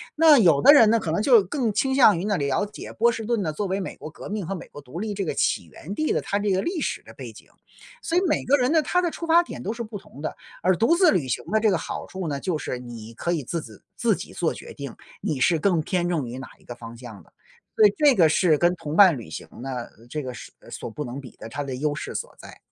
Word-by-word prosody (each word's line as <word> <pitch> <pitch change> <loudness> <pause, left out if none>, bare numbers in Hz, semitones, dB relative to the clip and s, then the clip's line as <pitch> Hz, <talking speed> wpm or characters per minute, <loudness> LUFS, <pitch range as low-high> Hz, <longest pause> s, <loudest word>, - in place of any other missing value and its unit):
那 310 -2 +7
有 165 -8 +5
的 290 - +9
人 225 -7 +7
那 230 - +4
可 165 - -3
能 170 - 0
就 235 -3 +6
更 230 +4 -1
倾 265 +6 +1
向 230 -8 +6
于 175 - -3
那 205 -3 +1
了 140 +5 0
解 205 - -9
波 235 +2 +3
士 225 - -5
顿 230 -1 0
呢， 155 -2 -2
作 200 +6 -2
为 190 +1 -1
美 - - -6
国 155 - -8
革 155 - -10
命 205 -4 -4
和 195 - -3
美 170 - -9
国 145 - -11
独 140 +7 -9
立 215 0 -3
这 195 -1 -3
个 - - -2
起 - - +1
源 190 +6 -9
地 310 +7 -1
的 - - 0
它 200 - -1
这 205 0 -1
个 190 0 +2
历 340 -3 -2
史 - - -3
的 - - -14
背 - - -9
景。 - - -16 0.5
所 335 - -1
以 365 - +4
每 - - +1
个 280 - +4
人 255 +2 +1
的 320 -1 +4
他 360 +5 +1
的 345 -2 -1
出 335 - -6
发 340 +2 +5
点 - - -8
都 210 - -2
是 235 0 -5
不 215 -1 -7
同 140 - -16
的， 155 - -4 0.3
而 185 +1 +4
独 235 +10 +3
自 360 -1 +5
旅 155 -9 0
行 120 - -2
的 220 - +3
这 220 - +3
个 185 - +2
好 - - -6
处 185 -3 -5
呢， 140 -2 -2
就 175 +1 -2
是 125 -4 -4
你 115 -2 -9
可 170 +9 -3
以 150 -5 -2
自 165 +6 -3
子 110 -7 -14
自 - - +2
己 - - -9
做 - - 0
决 - - -10
定， - - -8 0.3
你 145 - -2
是 160 +5 +3
更 180 -2 +2
偏 175 +1 -1
重 150 -8 -1
于 125 +2 -7
哪 135 - -8
一 - - -24
个 120 - -8
方 115 0 -10
向 115 -5 -11
的， - - -26 0.4
所 215 - +6
以 205 - +5
这 290 -4 +5
个 165 -4 +5
是 160 0 +3
跟 175 +3 +3
同 150 -3 -6
伴 185 -5 +7
旅 115 - -9
行 80 - -7
呢， 135 - -5 0.3
呃， 115 +2 -18
这 150 +1 -4
个 125 -1 -5
是 - - -10 0.2
所 - - -6
不 150 +7 -5
能 130 +3 -6
比 125 - -13
的， - - -9
它 145 +4 -4
的 135 -2 -5
优 145 +3 -1
势 - - -6
所 - - -5
在。 - - -13
180 Hz, 320 characters per minute, -24 LUFS, 145-225 Hz, 0.5 s, 的